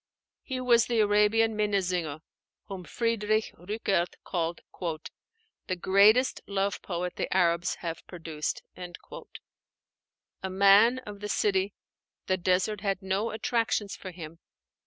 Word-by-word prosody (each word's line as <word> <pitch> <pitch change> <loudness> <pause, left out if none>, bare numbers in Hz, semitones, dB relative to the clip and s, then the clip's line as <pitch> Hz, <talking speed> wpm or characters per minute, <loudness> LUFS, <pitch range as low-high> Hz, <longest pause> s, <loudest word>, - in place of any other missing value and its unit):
He 260 -2 -4
was 240 -3 +4
the 235 -2 +1
Arabian 210 +2 +3
Minnesinger, 180 -7 -1 0.4
whom 190 -3 -7
Friedrich 220 -1 0
Rückert 190 -1 -1
called 170 -2 -2 1.1
"the 185 - -1
greatest 200 +8 +4
love 200 -1 -1
poet 180 -1 -4
the - - -3
Arabs 175 -1 +2
have 165 -1 -5
produced." 160 -3 -4 1.8
A 190 - -3
man 200 +6 +6
of 205 -1 -8
the 210 0 -5
city, 195 -1 +1 0.5
the 185 - +1
desert 190 +3 +1
had 195 -2 -1
no 195 +4 0
attractions 225 -2 -1
for 190 - -8
him. 165 -2 -9
195 Hz, 115 wpm, -28 LUFS, 180-215 Hz, 1.8 s, man